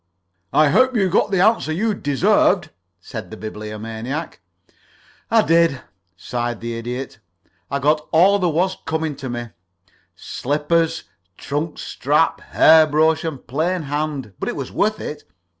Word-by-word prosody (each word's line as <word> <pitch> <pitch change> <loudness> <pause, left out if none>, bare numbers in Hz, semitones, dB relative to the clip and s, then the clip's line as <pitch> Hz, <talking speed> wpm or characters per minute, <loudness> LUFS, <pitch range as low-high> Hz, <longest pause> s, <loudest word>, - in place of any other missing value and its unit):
"I 155 -1 +4
hope 255 - +3
you 195 -4 +2
got 200 - +2
the 190 -3 +1
answer 215 -5 +3
you 210 +7 0
deserved," 180 +1 +2 0.3
said - - -8
the - - -9
Bibliomaniac. 110 +7 -6 0.9
"I 225 -1 +4
did," 165 -4 +3 0.4
sighed 120 +4 -3
the 115 0 -5
Idiot. 120 +1 -6 0.5
"I 140 - -1
got 150 +2 +1
all 190 +5 +5
there 180 -2 +1
was 180 +4 0
coming 160 -2 -2
to 135 -2 -6
me 120 -1 -5 0.7
slippers, 160 +4 -1 0.3
trunk 150 +3 -3
strap, - - 0
hair 160 0 +5
brush, 160 +1 +2
and 155 -5 -5
plain 160 +7 -1
hand; 145 -6 -3
but - - -2
it - - -4
was - - -5
worth - - 0
it. - - -6
155 Hz, 140 wpm, -20 LUFS, 130-170 Hz, 0.9 s, all